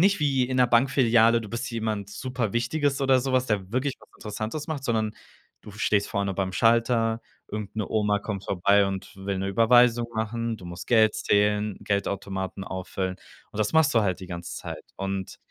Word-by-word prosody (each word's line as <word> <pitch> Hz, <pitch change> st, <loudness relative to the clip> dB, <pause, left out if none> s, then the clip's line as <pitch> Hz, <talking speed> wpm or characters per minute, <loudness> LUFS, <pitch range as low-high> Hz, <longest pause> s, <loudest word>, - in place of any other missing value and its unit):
nicht 195 Hz, 0 st, +4 dB
wie 135 Hz, -4 st, +2 dB
in 130 Hz, 0 st, -2 dB
'ner 125 Hz, -, +6 dB
Bankfiliale, 120 Hz, -2 st, +4 dB
du 110 Hz, -, -8 dB
bist 115 Hz, +2 st, -4 dB
jemand 110 Hz, -3 st, -3 dB
super 125 Hz, -3 st, -3 dB
Wichtiges 140 Hz, +4 st, 0 dB
oder 135 Hz, -1 st, +4 dB
sowas, 130 Hz, 0 st, +1 dB
der 105 Hz, -2 st, +1 dB
auch -, -, -11 dB
wirklich 130 Hz, +5 st, -1 dB
was -, -, -18 dB
Interessantes 110 Hz, +8 st, -5 dB
macht, 150 Hz, -4 st, -4 dB
sondern: 110 Hz, -3 st, 0 dB, 0.5 s
Du -, -, -11 dB
stehst 100 Hz, 0 st, +1 dB
vorne 100 Hz, -1 st, -1 dB
beim 95 Hz, 0 st, -2 dB
Schalter, 115 Hz, +2 st, +2 dB, 0.3 s
irgend 105 Hz, -1 st, -5 dB
'ne 110 Hz, -, -2 dB
Oma 105 Hz, -1 st, +1 dB
kommt 100 Hz, -2 st, -5 dB
vorbei 100 Hz, +2 st, +3 dB
und 95 Hz, -1 st, -5 dB
will 95 Hz, 0 st, -3 dB
'ne 95 Hz, +1 st, -2 dB
Überweisung 120 Hz, +3 st, +4 dB
machen, 115 Hz, +1 st, -2 dB
du 90 Hz, -, -10 dB
musst 85 Hz, +1 st, -8 dB
Geld 110 Hz, -2 st, +5 dB
zählen, 105 Hz, 0 st, +1 dB
Geldautomaten 100 Hz, -1 st, -3 dB
auffüllen, 95 Hz, 0 st, -4 dB, 0.4 s
und 105 Hz, -, -8 dB
das 105 Hz, -, 0 dB
machst 160 Hz, -5 st, +4 dB
du 115 Hz, -, +5 dB
halt 95 Hz, -3 st, -1 dB
die 95 Hz, -, -8 dB
ganze 85 Hz, -1 st, -6 dB
Zeit -, -, -7 dB
und 95 Hz, -1 st, -4 dB
110 Hz, 190 wpm, -26 LUFS, 100-120 Hz, 0.5 s, ner